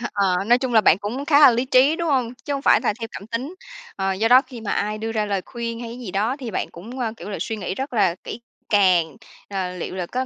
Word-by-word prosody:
Hơ 240 - -3
ờ, 195 -2 +1
nói 240 +2 +5
chung 260 -1 -3
là 220 - +7
bạn 190 -2 +4
cũng 240 +8 -4
khá 290 0 +4
là 290 - +9
lý 240 +2 0
trí, 265 +4 +4
đúng 340 -1 -2
hông? 255 -4 0
Chứ 290 - -3
hổng 275 -1 -3
phải - - +5
là - - +1
theo 225 - -4
cảm 200 - -8
tính. 255 +10 -4 0.4
Ờ, 195 0 0
do 220 +4 0
đó 255 +2 +7
khi 255 -3 -11
mà 215 - -4
ai 210 +1 -1
đưa 225 +1 -4
ra 215 -1 0
lời 200 -2 -1
khuyên 235 -1 -5
hay 235 - -6
cái 240 - -8
gì 230 -7 -7
đó 215 +7 0
thì 255 -5 -6
bạn - - -3
cũng, 230 +10 -10
ơ, 225 -3 -2
kiểu 210 - -8
là, 200 - -4
suy 225 - -3
nghĩ 185 -2 -4
rất 270 +3 -5
là 190 -7 +2
kỹ 240 - -7 0.3
càng, 185 -6 +3 0.3
ờ, 190 -2 -3
"liệu 180 - -5
là 180 -2 -3
có 255 +6 -2
225 Hz, 295 wpm, -22 LUFS, 200-255 Hz, 0.4 s, là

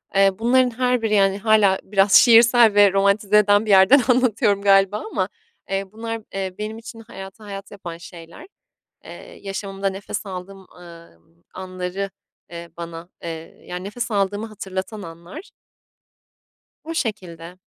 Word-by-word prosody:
eee, 195 0 +5
bunların 250 +2 +3
her 250 -1 +1
biri, 220 -1 -1
yani, 195 -1 +3
hâlâ 205 -2 +3
biraz 195 0 +1
şiirsel 235 -2 +6
ve 205 -1 +5
romantize 200 +1 +2
eden 205 +1 +3
bir 215 - -6
yerden 195 +9 +6
anlatıyorum 220 -5 +2
galiba 195 0 +3
ama, 190 -2 -1 0.4
eee, 195 0 -2
bunlar, 225 +1 -6
eee, 190 -1 -4
benim 215 +1 -5
için 225 0 -11
hayatı 195 -2 -11
hayat 200 -1 -9
yapan 175 -4 -8
şeyler. 170 - -13 0.6
Eee, - - -12
yaşamımda 195 0 -4
nefes 195 +2 -6
aldığım, 190 0 -9
ııı, 170 - -15 0.4
anları, 185 +1 -5 0.4
eee, 170 -1 -9
bana, 170 0 -8
eee, 165 -1 -9
yani, 180 +1 -6
nefes 235 +4 -5
aldığımı 205 +1 -1
hatırlatan 200 0 -6
anlar. 170 - -11 1.3
O 330 +1 -6
şekilde. 180 - -5
195 Hz, 140 wpm, -21 LUFS, 185-220 Hz, 1.3 s, şiirsel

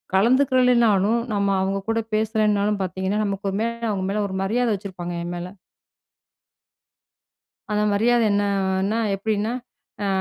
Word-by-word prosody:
கலந்துக்கலனாலும் 235 -2 +3
நம்ம 200 -1 +1
அவங்க 195 +1 -1
கூட 225 0 +1 0.2
பேசலனாலும் 210 -1 +1
பார்த்தீங்கன்னா, 190 +2 -2
நமக்கு 195 -1 -2
மேல 235 +1 -2
அவங்க 190 -2 -2
மேல 210 +1 0
ஒரு 190 - -6
மரியாத 235 +5 +1
வச்சிருப்பாங்க 185 -3 -6
என் 175 +1 -5
மேல. 175 +1 -5 2.2
அந்த 210 0 +1
மரியாதை 235 +3 +3
என்னன்னா, 200 0 0 0.2
எப்டின்னா 215 +2 -1 0.5
அ - - 0
205 Hz, 120 wpm, -23 LUFS, 195-225 Hz, 2.2 s, கலந்துக்கலனாலும்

